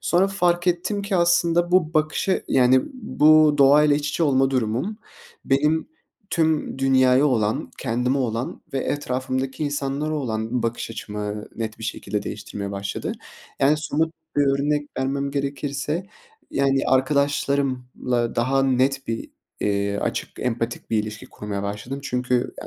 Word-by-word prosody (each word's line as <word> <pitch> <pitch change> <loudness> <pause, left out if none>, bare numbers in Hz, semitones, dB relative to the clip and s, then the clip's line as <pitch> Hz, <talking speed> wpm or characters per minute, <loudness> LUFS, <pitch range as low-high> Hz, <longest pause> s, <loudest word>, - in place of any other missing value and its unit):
Sonra 185 +3 +2
fark 175 -2 +1
ettim 185 +4 0
ki 200 -1 -1
aslında 175 0 +3
bu 170 -3 +3
bakışı 155 +5 +1
yani, 130 0 +5
bu 155 - +5
doğa 140 +2 +7
ile 150 -1 +4
iç 145 0 -2
içe 170 - -1
olma 135 -3 +3
durumum, 130 - -1 0.5
benim 150 - +2 0.4
tüm 160 -5 0
dünyaya 130 0 +4
olan, 110 -6 0
kendime 125 +2 0
olan 120 0 -2
ve 135 - 0
etrafımdaki 130 +1 -2
insanlara 145 +1 -2
olan 115 -3 -2
bakış 115 0 -2
açımı 105 -1 -5
net 110 -1 -4
bir 115 - -7
şekilde 105 -2 -3
değiştirmeye 100 -1 -6
başladı. 100 0 -4 0.5
Yani, 140 +2 +4
somut 160 +1 -1 0.2
bir 145 - +4
örnek 145 +2 +1
vermem 140 +1 -1
gerekirse, 140 +4 -2 0.4
yani, 135 -1 +2
arkadaşlarımla 130 -3 0
daha 135 +3 +2
net 135 +1 +1
bir, 115 0 -3 0.3
iii, 100 0 0
açık, - - -2
empatik 120 -1 -3
bir 110 - +2
ilişki 105 -1 -8
kurmaya 100 -1 -5
başladım. 105 +7 -5
Çünkü 125 -2 -1 0.3
ya, - - -8
135 Hz, 140 wpm, -23 LUFS, 120-150 Hz, 0.5 s, doğa